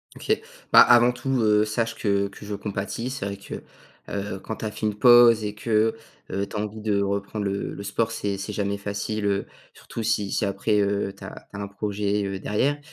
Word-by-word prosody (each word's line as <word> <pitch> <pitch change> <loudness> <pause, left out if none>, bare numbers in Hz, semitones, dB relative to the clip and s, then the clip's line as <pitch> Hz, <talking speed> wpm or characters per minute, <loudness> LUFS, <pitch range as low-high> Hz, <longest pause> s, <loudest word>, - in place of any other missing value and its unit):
OK. 435 0 0 0.3
Bah, - - +11
avant 120 0 +7
tout, 130 +1 -1
heu, 105 -1 +4
sache 115 +1 -1
que 100 -1 +1
que 100 - -13
je 105 - -4
compatis, 105 +4 -4
c'est 130 -7 -4
vrai 100 - -5
que, 100 - -8 0.5
heu, 100 -1 -4
quand 110 - -6
tu - - -5
as 105 - -2
fait 110 0 -2
une 105 - -1
pause 120 0 +7
et 105 0 -3
que, 110 +1 +1 0.4
heu, 100 +1 -1
tu 100 - -10
as - - -1
envie 105 +1 -4
de 105 -2 +1
reprendre 100 +1 -2
le 100 0 -2
le 100 - -7
sport 110 +3 -1
c'est 100 -3 -2
c'est 100 +2 -4
jamais 100 0 -2
facile, 100 +1 -3
heu, 100 0 0 0.3
surtout - - -7
si 105 -2 0
si 105 - +1
après, 100 +2 +1
heu, 100 -1 0
tu - - -13
as - - -10
tu - - -6
as - - -4
un 100 - -4
projet, 100 0 -1
heu, 95 -1 -3
derrière 135 +9 0
105 Hz, 225 wpm, -25 LUFS, 100-110 Hz, 0.5 s, Bah